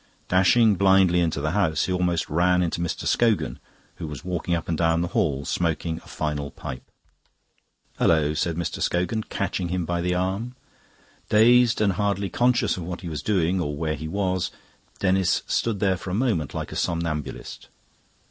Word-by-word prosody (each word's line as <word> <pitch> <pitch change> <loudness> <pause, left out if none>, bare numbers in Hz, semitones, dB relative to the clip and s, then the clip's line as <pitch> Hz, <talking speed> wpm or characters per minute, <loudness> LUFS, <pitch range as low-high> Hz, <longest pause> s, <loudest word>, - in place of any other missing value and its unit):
Dashing 100 +3 +4
blindly 95 -2 +4
into 80 -4 0
the 75 +1 -1
house, 90 -5 +1
he 95 - -1
almost 90 -3 0
ran 90 +3 +2
into 85 0 -2
Mr. 85 - -3
Scogan, 110 - +1 0.4
who 80 - -5
was 75 +3 -8
walking 90 -1 -1
up 85 - -4
and 85 - 0
down 80 0 +2
the 85 - -2
hall 70 -4 0
smoking 80 +1 -1
a - - -19
final 75 -2 -3
pipe. 65 -2 -7 1.2
"Hullo!" 75 -2 +3
said 80 +2 -1
Mr. 85 0 -3
Scogan, 90 +6 0
catching 95 -3 -3
him 90 -1 -1
by 85 +1 -1
the 90 +1 0
arm; 95 +7 -2 0.7
dazed 120 +2 +5
and 100 -2 +3
hardly 100 0 -1
conscious 125 -5 +2
of 90 - -5
what 90 +2 -6
he 90 - -6
was 75 -2 -4
doing 90 -2 +1
or 75 -3 -3
where 80 0 -1
he 75 +1 -5
was, 95 0 -1 0.5
Denis 95 -1 +1
stood 115 -4 -1
there 95 -2 +2
for 95 - -7
a 90 - -1
moment 105 - 0
like - - -4
a - - -6
somnambulist. 85 -4 -3
90 Hz, 175 wpm, -24 LUFS, 80-100 Hz, 1.2 s, dazed